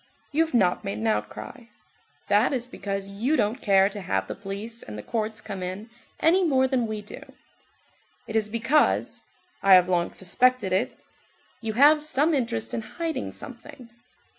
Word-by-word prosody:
You 310 +3 +3
have 320 -5 -4
not 185 -6 +2
made 100 - -3
an 110 - -4
outcry; 110 - -3 0.6
that - - +3
is 250 -2 -2
because 195 -5 -4
you 230 +10 0
don't 215 +6 0
care 195 -2 +4
to 205 0 -7
have 95 - -1
the - - -5
police 205 +4 -7
and 105 - -8
the 105 - -7
courts 220 -1 -3
come 195 -3 -6
in 190 +5 -5 0.3
any 360 +4 +4
more 265 -6 +3
than 255 -3 0
we 215 -1 -5
do. 205 - -10 1.0
It 220 - -7
is 215 -1 +1
because,—I 245 - +1
have 180 -1 +5
long 175 -2 +1
suspected 205 +1 +1
it,—you 220 +3 -5
have 295 +6 +6
some 305 +2 +2
interest 170 - -1
in - - -1
hiding 325 +8 -4
something. 240 -3 -11
220 Hz, 165 wpm, -25 LUFS, 190-260 Hz, 1.0 s, have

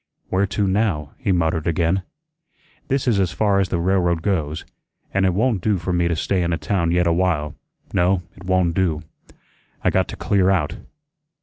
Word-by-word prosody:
"Where 95 +2 +1
to 100 +2 0
now?" 95 -7 0
he 115 -7 0
muttered 80 -2 0
again. 85 +3 +1 0.9
"This 135 -1 0
is 110 -5 +3
as 95 -3 +1
far 100 +3 +2
as 95 -2 +1
the 90 - 0
railroad 85 -2 +1
goes, 80 -6 -1 0.5
an' 95 0 +2
it 95 - +2
won' 115 0 +2
do 105 +2 +1
for 90 +1 -3
me 85 -1 +2
to 85 - 0
stay 95 +4 0
in 85 0 0
a 85 - 0
town 85 +2 0
yet 90 +1 +2
a 85 - +3
while; 85 -4 0 0.4
no, 90 +1 +2
it 95 - -14
won' 90 -2 +2
do. 80 -4 0 0.8
I - - +3
got - - +2
to - - -7
clear 95 -2 +2
out. 85 -1 0
90 Hz, 195 wpm, -21 LUFS, 85-95 Hz, 0.9 s, is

